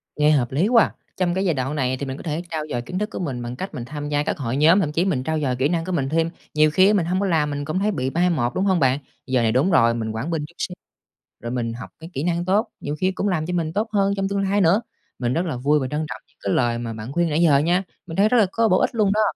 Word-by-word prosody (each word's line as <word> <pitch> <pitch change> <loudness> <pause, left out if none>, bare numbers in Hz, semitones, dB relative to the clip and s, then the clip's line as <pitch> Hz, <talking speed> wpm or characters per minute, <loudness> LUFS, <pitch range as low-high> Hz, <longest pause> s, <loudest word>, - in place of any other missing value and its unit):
Nghe 150 0 +4
hợp 130 -6 +2
lý 155 +9 +2
quá 230 -2 +6
à. - - -3 0.2
Trong 180 -2 +1
cái 190 +2 0
giai 175 - +2
đoạn 135 +1 -2
này 130 -3 0
thì 140 - -4
mình 135 0 -5
có - - -10
thể 155 0 -2
trau 155 -2 -2
dồi 120 - -1
kiến 180 +10 -5
thức 210 +1 -2
của - - -6
mình 135 -9 -3
bằng 120 +1 -5
cách 190 +9 -6
mình 120 - -5
tham 145 +2 -6
gia 145 0 +1
các - - -2
hội 130 -3 -2
nhóm, 165 +6 +5
thậm 155 -6 0
chí 165 +4 +1
mình 150 -10 0
trau 160 +2 -1
dồi 130 -4 0
kỹ 130 +3 +1
năng 165 -1 -1
của 185 - -4
mình 140 -7 0
thêm. 165 +2 +1 0.2
Nhiều 155 0 +4
khi 185 +5 +5
á 210 - +4
mình 190 -5 +2
hông 180 +2 0
có 200 - 0
làm, 160 -5 +1
mình 145 0 -3
cũng 155 +5 -1
thấy 210 +2 +1
bị 130 -9 -2
mai 175 +5 +2
một, 125 -8 0
đúng 190 - +1
hông 190 -3 +3
bạn? 135 -1 +2 0.3
Giờ 130 -2 +2
này 115 -1 +2
đúng 135 +11 +2
rồi, 115 -8 +5
mình 115 -1 -3
quản 115 +9 -4
binh 155 -3 -1
chút 170 - -22
xíu 180 - -3 0.7
rồi 120 - -4
mình 120 -2 -2
học 115 0 -8
cái 165 +1 -9
kỹ 135 - -3
năng 175 0 0
tốt, 200 +5 +2
nhiều 145 +1 -4
khi 185 0 +2
cũng 195 +2 -2
làm 170 -5 0
cho 180 - -3
mình 165 -2 -1
tốt 215 +4 0
hơn 200 -2 +2
trong 195 0 0
tương 200 0 0
lai 200 +1 +1
nữa. 190 +5 +4 0.4
Mình 120 -1 0
rất 170 +5 0
là 155 -7 -3
vui 145 +4 +2
và 130 - -2
trân 150 +4 -2
trọng 110 - -6
những - - -34
cái 100 - -1
lời 120 -2 +1
mà 115 -1 -4
bạn 110 +3 -7
khuyên 170 +2 +1
nãy 155 +2 +1
giờ 155 -5 +5
nha. 175 +6 +2 0.2
Mình 165 - -7
thấy 205 +2 +4
rất 250 - +3
là 220 - +6
có 230 +2 +2
bổ 185 - +4
ích - - 0
luôn 210 -3 +3
đó. 215 - +2
155 Hz, 330 wpm, -22 LUFS, 130-185 Hz, 0.7 s, quá